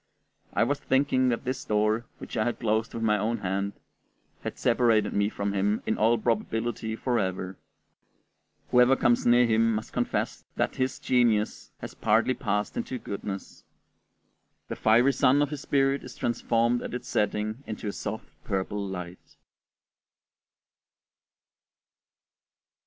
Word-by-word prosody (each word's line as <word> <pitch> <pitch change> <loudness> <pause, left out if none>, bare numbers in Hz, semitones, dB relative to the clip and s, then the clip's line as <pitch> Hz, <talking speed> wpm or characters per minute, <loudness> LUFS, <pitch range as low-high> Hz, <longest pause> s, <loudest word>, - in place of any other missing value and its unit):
I - - +4
was 140 +4 0
thinking 130 -1 +2
that 115 - -1
this 130 +1 -2
door, 110 +2 +1
which - - -8
I 110 - +2
had 120 - -2
closed 110 0 0
with 115 - -3
my 105 -1 +3
own 115 +3 0
hand, 100 0 -2 0.7
had - - -5
separated 115 -3 +2
me 100 0 +2
from 100 -1 -3
him 100 +2 0
in - - 0
all 115 +2 +3
probability 115 0 -1
forever. 95 -6 -2 1.1
Whoever 125 +2 +6
comes 120 -2 +2
near 120 +1 +6
him 115 0 +3
must 110 - -5
confess - - -1
that - - -1
his 130 0 0
genius 115 -4 +1
has - - -7
partly 110 +4 +2
passed 105 -5 -2
into 130 - -3
goodness; 100 -3 -6 1.1
the - - -3
fiery 120 +5 +4
sun 130 +2 +4
of 145 0 +1
his 145 -2 -5
spirit 135 -1 +1
is - - -10
transformed 120 0 +1
at - - -5
its 125 0 -6
setting 105 +4 -1
into 110 -1 -5
a - - -1
soft 110 +2 -6
purple 100 0 -2
light. 90 -2 -7
115 Hz, 140 wpm, -27 LUFS, 105-125 Hz, 1.1 s, Whoever